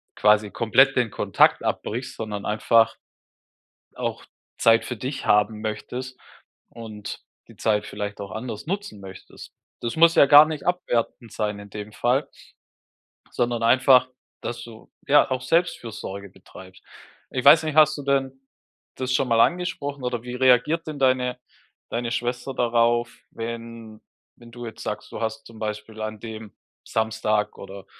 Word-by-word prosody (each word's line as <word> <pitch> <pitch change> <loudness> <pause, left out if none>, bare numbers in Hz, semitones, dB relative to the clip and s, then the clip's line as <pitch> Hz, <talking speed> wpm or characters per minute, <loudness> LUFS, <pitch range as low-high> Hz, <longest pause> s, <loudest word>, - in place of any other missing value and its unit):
quasi 105 0 +3
komplett 135 +4 +4
den 120 -3 +1
Kontakt - - +3
abbrichst, 120 +4 -3
sondern 105 -2 -5
einfach 115 +1 +3 1.0
auch - - -4 0.3
Zeit 115 0 +4
für 125 - -5
dich 130 +5 -5
haben 105 +1 +2
möchtest 125 +4 -5 0.5
und 110 -3 -8 0.3
die - - -16
Zeit 105 -1 0
vielleicht 105 0 -6
auch 100 - -7
anders 110 0 -6
nutzen 195 - -4
möchtest. 95 -1 -12 0.3
Das 115 - -3
muss 165 +1 +5
ja - - +7
gar 145 +2 +9
nicht 155 -2 -6
abwertend 120 -9 -1
sein 105 -1 -2
in 100 0 -12
dem 105 +1 -8
Fall 130 +6 0 1.1
sondern 120 -1 0
einfach, 130 +1 +5 0.3
dass 120 0 -5
du, 115 -2 -14 0.2
ja, 145 0 +5
auch 130 0 -1
Selbstfürsorge 115 - -2
betreibst. 95 0 -15 0.5
Ich 130 - -2
weiß 150 +3 +8
nicht, 155 -2 -3
hast 155 -1 +5
du 145 - -7
denn 135 -1 -1 0.5
das 130 0 -2
schon 130 - +1
mal 115 -1 +3
angesprochen, 145 -3 0
oder 125 -2 -2
wie 125 0 -6
reagiert 130 +6 +3
denn 150 -2 -6
deine 125 -1 +1 0.5
deine 115 0 -3
Schwester 125 +3 -3
darauf, 120 -1 +1 0.2
wenn 115 -1 -8 0.4
wenn 120 -1 -15
du 120 0 -8
jetzt 110 - -9
sagst, 105 0 -5
du - - -7
hast 110 0 -3
zum 115 -1 -14
Beispiel 110 0 -5
an 110 0 -5
dem 110 -2 -9 0.3
Samstag 110 -1 -1
oder 100 -1 -10
115 Hz, 150 wpm, -24 LUFS, 110-130 Hz, 1.1 s, gar